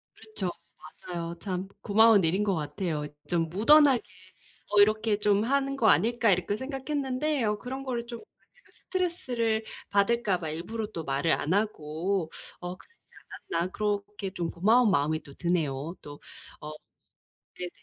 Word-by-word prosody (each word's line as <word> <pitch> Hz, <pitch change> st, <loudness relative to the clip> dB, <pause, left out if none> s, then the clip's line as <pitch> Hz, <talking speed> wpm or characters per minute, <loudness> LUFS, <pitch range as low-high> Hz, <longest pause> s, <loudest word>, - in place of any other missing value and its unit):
그렇죠. 215 Hz, -4 st, -4 dB, 0.5 s
맞아요. 170 Hz, -1 st, -5 dB
참 185 Hz, 0 st, -3 dB
고마운 215 Hz, -1 st, +5 dB
일인 185 Hz, +6 st, +2 dB
것 195 Hz, -3 st, +1 dB
같아요. 150 Hz, 0 st, -3 dB, 0.2 s
'좀 165 Hz, -2 st, 0 dB
무던하게 265 Hz, -, +5 dB, 0.7 s
어 205 Hz, -1 st, +6 dB
이렇게 215 Hz, 0 st, +3 dB
좀 205 Hz, 0 st, +3 dB
하는 275 Hz, +2 st, +1 dB
거 230 Hz, -5 st, +2 dB
아닐까.' 230 Hz, -1 st, +3 dB
이렇게 185 Hz, +3 st, 0 dB
생각했는데 270 Hz, +1 st, -2 dB
'어 210 Hz, 0 st, 0 dB
그런 265 Hz, +3 st, -6 dB
거를 240 Hz, -3 st, -3 dB
좀 235 Hz, -1 st, -7 dB
아 -, -, -25 dB, 0.2 s
제가 -, -, -27 dB
스트레스를 245 Hz, -, -1 dB, 0.3 s
받을까 200 Hz, -1 st, +2 dB
봐 160 Hz, -3 st, -4 dB
일부러 210 Hz, +8 st, -4 dB
또 165 Hz, -5 st, -5 dB
말을 140 Hz, +3 st, 0 dB
안 155 Hz, -, 0 dB
하고 180 Hz, -3 st, -1 dB, 0.3 s
어 180 Hz, 0 st, -5 dB
그러지 465 Hz, -, -21 dB, 0.6 s
않았나.' 170 Hz, +2 st, 0 dB
그렇게 205 Hz, -1 st, -2 dB
좀 170 Hz, -3 st, -3 dB
고마운 220 Hz, +6 st, +4 dB
마음이 155 Hz, 0 st, +1 dB, 0.2 s
드네요 165 Hz, -2 st, -1 dB
또. 145 Hz, 0 st, -10 dB, 0.4 s
어 150 Hz, 0 st, -6 dB, 0.9 s
네네. 180 Hz, -1 st, -4 dB
205 Hz, 305 characters per minute, -28 LUFS, 170-235 Hz, 0.9 s, 어